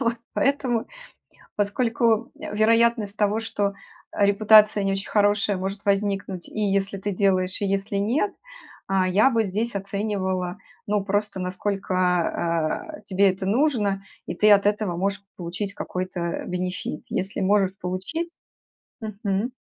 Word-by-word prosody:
Вот. 230 -2 +1 0.2
Поэтому, 260 -5 +1 0.7
поскольку, 230 +2 +1
э, - - -6
вероятность 225 -1 +3
того, 210 +1 +1
что, 205 -3 -1 0.4
э, 200 - +3
репутация 210 +1 +6
не 195 - +1
очень 195 0 -3
хорошая 205 -1 +2
может 195 +2 -4
возникнуть 195 -2 -1
и 215 - -5
если 195 -1 0
ты 205 +2 -3
делаешь, 185 -1 +1
и - - +1
если 195 +1 -1
нет, 250 - +1 0.6
а, 190 -1 +2
я 210 +8 +4
бы 230 -3 +2
здесь 215 +4 -2
оценивала, 195 -2 -2 0.3
ну, 205 0 +1
просто 205 -1 -1
насколько, 180 - -1
э, - - -17
тебе 195 0 +3
это 190 +1 -4
нужно 210 -4 +1 0.2
и - - -4
ты 215 - +4
от 200 -1 +6
этого 205 -4 0
можешь 200 +2 -1
получить 185 +3 -4
какой-то 180 -3 -4
бенефит. 180 -3 -3
Если 195 +2 -3
можешь 195 -1 +2
получить 190 - -3 0.7
Мгм. 210 +1 -2
200 Hz, 135 wpm, -24 LUFS, 190-215 Hz, 0.7 s, репутация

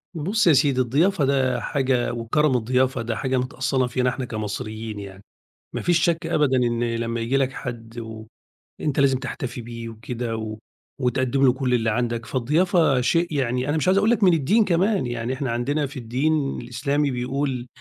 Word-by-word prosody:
بُصّ 185 +6 +1
يا 160 - +7
سيدي، 135 -1 +3
الضيافة 150 +7 +2
ده 130 -2 +1
حاجة 130 -4 0
وكرَم 125 +4 +1
الضيافة 125 +2 +1
ده 115 -1 -2
حاجة 130 -1 -1
متأصّلة 130 0 0
فينا 125 0 +1
إحنا 130 0 -4
كمصريين 110 0 -5
يعني، 100 -1 -10 0.5
ما - - -3
فيش 175 -1 +2
شك 165 -1 +1
أبدًا 145 -5 +2
إن 120 -1 +1
لمّا 115 0 -2
ييجي 115 +4 0
لك 135 -1 0
حَد 120 -2 -7
وأنت 110 +5 -7
لازم 135 -2 +3
تحتفي 125 -2 -5
بيه 115 0 -7
وكده 115 +1 -5
و 110 -1 -5 0.4
وتقدّم 130 +1 +1
له 125 - +5
كل 130 -1 -1
اللي 115 -2 +2
عندك، 115 0 -1
فالضيافة 150 +2 +2
شيء 165 +6 +1
يعني 130 -1 0
أنا 155 - +1
مش 155 - -1
عايز 190 +1 +4
أقول 205 +3 +3
لك 230 -3 +2
من 180 - +6
الدين 180 - +3
كمان، 190 -2 +2
يعني 120 +1 -3
إحنا 130 -1 -3
عندنا 140 +6 0
في 135 0 -8
الدين 135 +5 0
الإسلامي 140 +4 -1
بيقول 125 0 -2
130 Hz, 180 wpm, -23 LUFS, 120-145 Hz, 0.5 s, يا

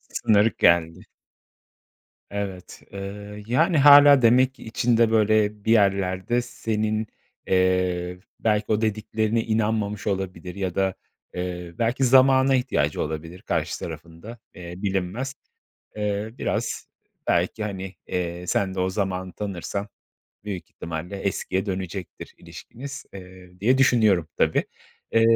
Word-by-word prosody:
Sınır 110 +1 +2
geldi. 85 +3 +3 1.2
Evet. 100 -3 -6
Iıı, 105 +1 -7
yani 160 +8 +2
hâlâ 145 -1 +8
demek 125 +3 +4
ki - - -14
içinde 115 0 +2
böyle 105 -1 +2
bir 110 - +2
yerlerde 100 +2 +2
senin, 110 -2 -2 0.4
eee, 90 -1 +1 0.2
belki 105 -1 +1
o 110 +1 +2
dediklerine 110 +1 0
inanmamış 110 -2 -1
olabilir 95 -2 -3
ya 95 -3 -3
da, 95 -1 +1 0.4
eee, 90 -1 -5
belki 120 +3 0
zamana 130 +1 +5
ihtiyacı 125 - 0
olabilir 80 +3 -5
karşı - - -2
tarafın 80 0 -8
da, 115 +3 -9 0.2
eee, 85 -1 -9
bilinmez. 100 +7 -2 0.6
Eee, 105 0 -2
biraz - - -2 0.4
belki 110 - +1
hani, 95 -2 -5
eee, 90 0 -3
sen 95 -1 0
de - - -3
o 95 0 +1
zamanı 95 -2 -3
tanırsan 100 0 -4 0.6
büyük 100 -4 -6
ihtimalle 85 +4 -6
eskiye 95 0 -2
dönecektir 95 -2 -6
ilişkiniz, 135 +3 -10
eee, 90 -1 -13
diye 125 +7 +3
düşünüyorum, 110 - +4
tabii. - - +2 0.5
Eee, 115 0 +5
100 Hz, 120 wpm, -24 LUFS, 90-115 Hz, 1.2 s, hâlâ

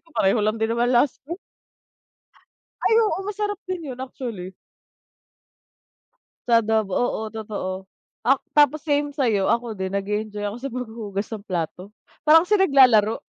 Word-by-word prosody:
ko, 330 - -28
pareho 195 +3 +3
lang 215 +2 +1
din 220 +1 0
naman 235 +1 +1
las 250 +2 +2
m 340 - -3 1.5
Ay, 445 - +3
oo, 420 - 0
masarap 415 -1 -3
din 345 -7 -4
yun 255 - -9
actually. 230 -8 -6 1.9
Sa 230 -1 +6
adobo. 215 -3 0
Oo, 245 -2 0
totoo. 210 -4 -4 0.5
Ak 270 +1 +2
tapos 295 +1 +3
same 290 -1 0
sa'yo, 220 -9 +1
ako 235 -1 0
din 190 +1 -3
nag-e-enjoy 210 +1 -3
ako 205 +2 -3
sa 275 - -4
paghuhugas 220 -5 -5
ng 210 -2 -6
plato, 180 0 -3 0.4
parang 325 +2 +8
kasi 415 +2 +2
naglalaro. 255 - +5
235 Hz, 145 wpm, -23 LUFS, 210-285 Hz, 1.9 s, parang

